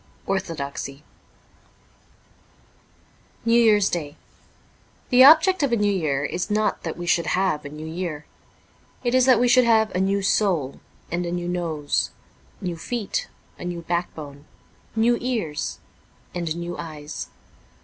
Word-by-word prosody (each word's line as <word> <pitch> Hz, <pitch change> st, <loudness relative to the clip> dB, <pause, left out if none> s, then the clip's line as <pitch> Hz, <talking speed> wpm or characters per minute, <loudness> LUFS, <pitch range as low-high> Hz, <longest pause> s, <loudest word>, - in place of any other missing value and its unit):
Orthodoxy,' 150 Hz, -7 st, -4 dB, 2.4 s
NEW 235 Hz, +1 st, +5 dB
YEAR'S 210 Hz, -3 st, +4 dB
DAY 150 Hz, -4 st, -3 dB, 1.0 s
THE 250 Hz, +1 st, +8 dB
object 320 Hz, +6 st, +7 dB
of 280 Hz, -3 st, +1 dB
a -, -, +4 dB
New 205 Hz, -2 st, +2 dB
Year 145 Hz, -6 st, 0 dB
is 175 Hz, +5 st, -3 dB
not 210 Hz, 0 st, 0 dB
that -, -, -5 dB
we 175 Hz, -, -5 dB
should 170 Hz, 0 st, +2 dB
have 185 Hz, -5 st, +1 dB
a -, -, -5 dB
new 150 Hz, +2 st, -8 dB
year. 160 Hz, -2 st, -4 dB, 0.8 s
It 240 Hz, -1 st, 0 dB
is 255 Hz, 0 st, +4 dB
that 255 Hz, -4 st, +6 dB
we 245 Hz, -, +3 dB
should 255 Hz, +1 st, +6 dB
have 220 Hz, -2 st, +3 dB
a 180 Hz, -, 0 dB
new 195 Hz, +1 st, +1 dB
soul 180 Hz, -10 st, +1 dB, 0.3 s
and 175 Hz, +1 st, -1 dB
a 170 Hz, -, -3 dB
new 175 Hz, 0 st, -3 dB
nose; 165 Hz, -5 st, -1 dB, 0.5 s
new 175 Hz, -3 st, -3 dB
feet, 225 Hz, +4 st, -3 dB, 0.3 s
a -, -, -7 dB
new 175 Hz, -1 st, -4 dB
backbone, 155 Hz, -4 st, -4 dB, 0.5 s
new 235 Hz, +2 st, +3 dB
ears, 225 Hz, -12 st, -2 dB, 0.6 s
and 170 Hz, -3 st, -2 dB
new 170 Hz, 0 st, -5 dB
eyes. 155 Hz, -2 st, -6 dB
175 Hz, 140 wpm, -24 LUFS, 160-220 Hz, 2.4 s, THE